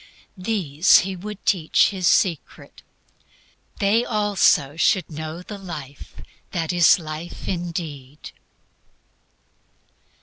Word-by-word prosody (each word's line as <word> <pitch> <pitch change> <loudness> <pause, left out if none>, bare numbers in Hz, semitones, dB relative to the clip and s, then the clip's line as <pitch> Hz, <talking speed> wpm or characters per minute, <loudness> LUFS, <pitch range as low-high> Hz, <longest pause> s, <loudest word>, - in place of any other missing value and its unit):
These 185 -5 +3
He 190 +1 -5
would 205 +3 -9
teach 170 -6 +3
His 185 -3 -2
secret. 170 -7 -1 1.0
They, 210 +4 +2
also, 205 - +2
should 180 +2 +1
know 155 +3 -7
"the 205 +1 -9
life 150 -7 -9 0.4
that 170 -1 -2
is 175 +1 +5
life 160 0 -8
indeed." 160 -6 -6
175 Hz, 95 wpm, -22 LUFS, 155-195 Hz, 1.0 s, is